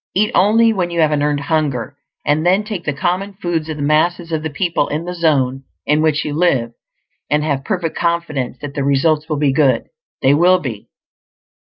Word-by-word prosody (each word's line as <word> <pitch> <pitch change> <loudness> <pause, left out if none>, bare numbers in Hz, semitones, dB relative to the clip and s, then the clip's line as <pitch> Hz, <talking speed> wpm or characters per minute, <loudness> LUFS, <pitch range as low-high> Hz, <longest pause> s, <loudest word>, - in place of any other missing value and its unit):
Eat 210 +3 +2
only 225 +4 +4
when 180 -4 -1
you 170 -1 -3
have 155 -1 +3
an 150 -1 +1
earned 145 -1 0
hunger, 140 -4 -1 0.3
and 150 +2 +1
then 185 +4 +3
take 210 -5 -6
the 150 - 0
common 185 +6 -2
foods 175 -5 -3
of 155 - -4
the 145 - -3
masses 165 +3 +1
of 160 -1 -1
the 160 - -3
people 170 +3 -1
in 155 +3 -3
the 180 - -4
zone 135 -6 +1 0.2
in 150 +1 +2
which 155 -1 +1
you 150 - -3
live, 140 -8 +1 0.6
and 150 0 +1
have 140 -3 -1
perfect 175 -2 -2
confidence 170 -7 -2
that 145 -1 -6
the 140 -2 -2
results 150 +3 +1
will 155 - -1
be 140 -2 +2
good. 135 -2 +2 0.3
They 135 - +5
will 175 +5 +5
be. 125 - -7
155 Hz, 205 wpm, -18 LUFS, 145-175 Hz, 0.6 s, They